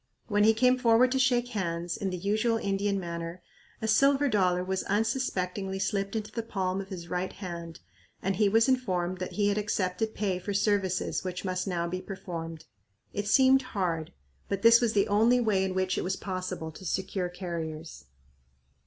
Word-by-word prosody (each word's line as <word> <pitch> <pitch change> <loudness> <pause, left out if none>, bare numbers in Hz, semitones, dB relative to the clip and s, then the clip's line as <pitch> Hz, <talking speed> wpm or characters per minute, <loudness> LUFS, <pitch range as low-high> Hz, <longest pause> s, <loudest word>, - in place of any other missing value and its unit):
When 205 -2 +2
he 220 0 +5
came 255 +2 +4
forward 245 +1 +4
to 265 - +1
shake 245 -2 +2
hands, 175 -6 -2
in 195 - -2
the 180 - -3
usual 215 +5 +1
Indian 200 -1 0
manner, 170 0 -6 0.4
a - - 0
silver 275 +6 +4
dollar 180 -5 +2
was 190 0 -2
un 205 +3 +2
suspectingly 195 -5 -2
slipped 195 +1 -1
into 215 -1 -3
the 230 - -3
palm 195 -4 -2
of 195 - -9
his 180 -3 -7
right 180 +1 -2
hand 170 -4 -7 0.4
and 195 -1 -1
he 205 -1 +4
was 225 +4 +4
informed 185 -9 0
that 185 - -4
he 205 -1 +2
had 205 +1 +1
accepted 210 +1 -1
pay 195 -3 -1
for 200 +2 -4
services 195 -3 +1
which 180 0 -4
must 185 +1 -2
now 170 -2 -1
be 185 +2 -3
performed. 165 -5 -7 0.5
It 205 0 -3
seemed 265 +4 +5 0.2
hard, 165 -4 -1 0.4
but 200 -1 -2
this 230 +1 +8
was 230 -2 +1
the 200 - +3
only 225 +4 +4
way 210 -5 +2
in 190 -1 -2
which 185 0 0
it - - -2
was 185 +1 -1
possible 185 -4 -4
to 160 - -12
secure 185 0 -2
carriers. 165 - -6
195 Hz, 190 wpm, -29 LUFS, 180-220 Hz, 0.5 s, this